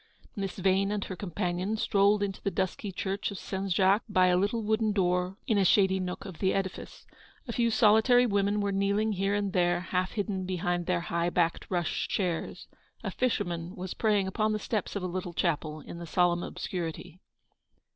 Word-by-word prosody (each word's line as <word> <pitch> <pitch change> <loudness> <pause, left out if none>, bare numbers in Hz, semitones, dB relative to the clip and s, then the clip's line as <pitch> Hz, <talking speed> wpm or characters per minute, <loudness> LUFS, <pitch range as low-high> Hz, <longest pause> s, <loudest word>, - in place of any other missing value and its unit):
Miss 195 -3 -4
Yane 195 +1 +2
and 210 -1 -1
her 185 - -6
companion 185 +2 -2
strolled 205 0 +3
into 195 -1 -3
the - - 0
dusky 190 +1 -2
church 195 +3 -2
of 200 - -6
Saint 190 +1 -4
Jacques 195 +4 +4
by 185 -2 +4
a 180 - +4
little 205 +5 0
wooden 215 0 +1
door 180 -1 0
in 215 -3 +2
a - - +4
shady 190 0 +4
nook 180 0 -4
of 185 -5 -9
the 190 - +1
edifice. 190 -1 -4 0.4
A - - -3
few 235 0 +2
soli 220 -1 +5
tary 245 +1 +5
women 205 -1 +1
were 200 0 0
kneeling 200 +2 +1
here 195 0 0
and 200 -2 -1
there, 175 -1 +2
half 185 +1 -2
hidden 195 -3 -2
behind 175 -1 -1
their 180 -2 +1
high 170 0 -1
backed 170 -1 0
rush 175 -3 -1
chairs. 180 -4 -2 0.4
A - - -3
fisherman 175 -8 -1
was 185 0 -5
praying 210 -3 +2
upon 215 +3 0
the - - 0
steps 215 -1 -3
of 200 - -3
a - - -1
little 180 -1 -4
chapel, 155 -2 -1
in 170 - -9
the 170 - -7
solemn 175 0 +2
obscurity. 175 -1 -5
190 Hz, 195 wpm, -29 LUFS, 180-205 Hz, 0.4 s, soli